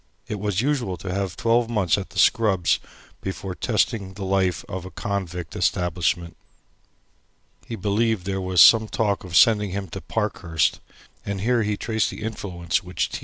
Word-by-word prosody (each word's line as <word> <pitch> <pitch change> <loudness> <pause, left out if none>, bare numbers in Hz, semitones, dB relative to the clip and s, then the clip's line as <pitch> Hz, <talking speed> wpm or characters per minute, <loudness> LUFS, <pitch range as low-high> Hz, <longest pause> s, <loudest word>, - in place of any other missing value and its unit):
It 105 - -4
was 105 0 0
usual 125 -9 -1
to 90 +2 -5
have 95 -2 -3
twelve 115 0 +2
months 100 -7 +2
at 100 -1 -5
the 100 - -12
Scrubbs 95 -4 +3 0.4
before 95 0 -5
testing 105 -2 -1
the 100 -1 -5
life 95 -4 0
of 95 -1 -5
a 95 - -8
convict 90 -2 -4
establishment. 85 -1 0 1.3
He 115 - -4
believed 105 0 0
there 95 0 -2
was 95 -2 +3
some 110 -1 +8
talk 105 -2 -1
of 90 -2 -6
sending 105 +3 +5
him 95 0 -4
to - - -7
Parkhurst, 80 -3 -1 0.4
and 100 -1 -4
here 120 +2 +2
he 105 -1 -1
traced 110 0 0
the - - -7
influence 90 -6 -2
which 90 -3 -2
T. - - -4
95 Hz, 170 wpm, -24 LUFS, 90-110 Hz, 1.3 s, some